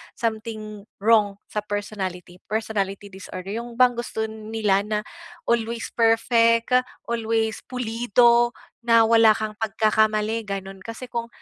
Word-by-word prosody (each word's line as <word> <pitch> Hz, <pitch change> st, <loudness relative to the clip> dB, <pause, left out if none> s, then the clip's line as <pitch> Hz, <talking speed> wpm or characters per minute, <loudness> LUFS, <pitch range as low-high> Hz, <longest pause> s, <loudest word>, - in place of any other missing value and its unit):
something 215 Hz, -2 st, -4 dB, 0.2 s
wrong 210 Hz, -3 st, +4 dB, 0.2 s
sa 210 Hz, -, -1 dB
personality, 190 Hz, -4 st, -5 dB
personality 205 Hz, -2 st, -2 dB
disorder, 190 Hz, 0 st, -8 dB
yung 235 Hz, 0 st, -8 dB
bang 250 Hz, +1 st, +5 dB
gusto 240 Hz, -2 st, -4 dB
nila 215 Hz, -2 st, -1 dB
na 210 Hz, -1 st, 0 dB, 0.4 s
always 235 Hz, 0 st, -1 dB
perfect, 230 Hz, +1 st, +3 dB, 0.3 s
always 225 Hz, -1 st, -1 dB
pulido, 240 Hz, 0 st, +2 dB, 0.2 s
na 230 Hz, -1 st, +5 dB
wala 225 Hz, -1 st, +6 dB
kang 215 Hz, -1 st, -3 dB
pagkakamali 215 Hz, 0 st, +1 dB
gano'n 195 Hz, -1 st, -5 dB
kasi 230 Hz, +5 st, -9 dB
kung 235 Hz, -1 st, -3 dB
220 Hz, 115 wpm, -24 LUFS, 210-230 Hz, 0.4 s, wala